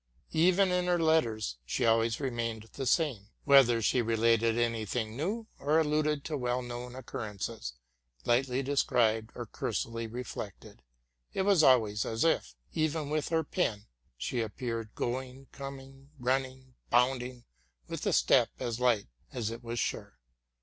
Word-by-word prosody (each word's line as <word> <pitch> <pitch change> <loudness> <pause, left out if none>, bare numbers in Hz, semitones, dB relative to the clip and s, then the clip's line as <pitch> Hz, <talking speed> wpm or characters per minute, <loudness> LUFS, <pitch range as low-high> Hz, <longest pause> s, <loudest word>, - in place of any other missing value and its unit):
Even 185 +4 +4
in 180 0 +1
her 175 -1 +3
letters 115 - +1
she 120 - -1
always 115 0 +3
remained 120 -5 -2
the 135 -2 -3
same: 125 - +1 0.2
whether 125 -5 +6
she 125 - +3
related 115 0 +2
any 115 -2 +1
thing 110 0 -3
new, 200 - -2
or 150 +3 +2
alluded 150 -2 +1
to 155 - -2
well 125 -2 -1
known 120 0 -6
occurrences, 105 - -5 0.5
lightly 125 +2 +2
described 115 -5 +2
or 120 - -5
cursorily 115 -1 -3
reflected, 110 -3 -7 0.5
it 190 - 0
was 195 -4 +5
always 110 -7 +4
as 115 0 -1
if, 165 - +1 0.2
even 155 -2 -1
with 155 -1 0
her 165 -1 +2
pen, 115 - -1 0.3
she 120 - -2
appeared 115 0 -4
going, 130 +2 -3
com 140 -1 -7
ing, 135 +1 -16
running, 130 0 -2 0.2
bounding 125 0 +1 0.4
with - - -5
a - - +3
step - - +4
as 115 - -3
light 120 -5 +3 0.3
as 115 -4 -2
it 115 +1 -8
was 120 0 -4
sure. 65 - -3
125 Hz, 150 wpm, -31 LUFS, 115-140 Hz, 0.5 s, whether